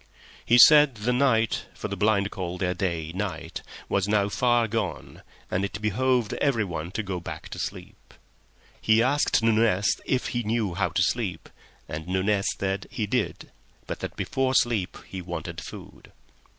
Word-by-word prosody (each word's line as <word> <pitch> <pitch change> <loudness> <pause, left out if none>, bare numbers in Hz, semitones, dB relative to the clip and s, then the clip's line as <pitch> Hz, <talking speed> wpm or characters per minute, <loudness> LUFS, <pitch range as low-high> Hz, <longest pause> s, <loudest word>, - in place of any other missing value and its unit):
He 120 - +4
said 150 0 +8
the 110 +4 -1
night—for 120 -4 0
the 100 - -4
blind 100 0 +2
call 90 -2 -4
their 90 0 0
day 85 -3 -2
night—was 95 0 -4
now 105 -1 +2
far 120 +1 +2
gone, 105 -6 -4 0.3
and 90 - 0
it 100 +1 -3
behooved 120 +2 +1
everyone 100 - 0
to 110 - -2
go 95 -3 -3
back 85 - -8
to - - -7
sleep. - - -7 0.7
He 110 +1 +4
asked 140 -2 +2
Nunez 110 -4 +2
if 130 -1 0
he 120 - -1
knew 110 -4 -1
how 85 - 0
to - - +1
sleep, - - -2 0.4
and 80 +2 -6
Nunez 100 +2 +1
said 95 0 -2
he 115 -5 -2
did, 120 +2 -2 0.3
but - - -5
that - - -5
before 130 0 -1
sleep 115 -7 +1
he 95 - -7
wanted 85 -1 -6
food. - - -11
105 Hz, 155 wpm, -26 LUFS, 95-120 Hz, 0.7 s, said